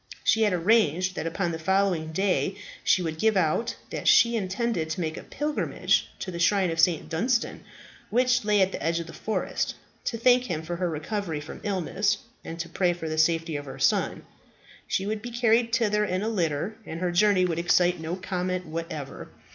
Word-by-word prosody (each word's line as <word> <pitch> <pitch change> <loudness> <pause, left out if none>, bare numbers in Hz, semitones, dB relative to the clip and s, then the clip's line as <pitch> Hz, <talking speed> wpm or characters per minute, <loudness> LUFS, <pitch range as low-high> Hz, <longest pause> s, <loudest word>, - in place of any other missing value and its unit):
She 225 - +3
had 210 -2 +4
arranged 185 -1 +2
that 165 - -3
upon 170 +1 -1
the 160 - -4
following 185 -2 +1
day 190 +3 0 0.3
she 185 - +3
would 160 -1 -4
give 220 0 +3
out 175 +6 +1 0.2
that - - -4
she 235 0 +6
intended 195 -4 -1
to 160 - -3
make 160 -2 -2
a - - -7
pilgrimage 300 0 0
to 185 - -4
the 170 - -6
shrine 190 0 +3
of 165 - -4
St. 165 -1 +3
Dunstan, 230 +9 -1 0.5
which 250 +1 +2
lay 210 -1 +3
at 190 0 +3
the - - -5
edge 165 +1 0
of 170 - -5
the 165 - -11
forest, 220 - -2 0.3
to 230 - -1
thank 250 +2 +4
him 160 -7 -3
for 170 +1 -4
her 180 0 -1
recovery 165 +1 -3
from 150 - -9
illness, 200 +1 0 0.3
and 165 +1 -7
to 170 - -6
pray 175 +1 +1
for 170 -2 -6
the 155 0 -2
safety 165 0 +2
of 145 0 -4
her 135 -1 -8
son. 135 0 +1 0.6
She 190 - -1
would 210 +1 -2
be 240 - -6
carried 235 -1 +2
thither 210 -3 +2
in 185 -1 -1
a 220 - 0
litter, 170 -1 -1
and 165 - -6
her 180 0 0
journey 185 +1 +4
would 170 -2 -1
excite 175 0 +3
no 160 +2 -3
comment 185 -1 -3
whatever. 160 -3 -6
185 Hz, 205 wpm, -26 LUFS, 165-210 Hz, 0.6 s, she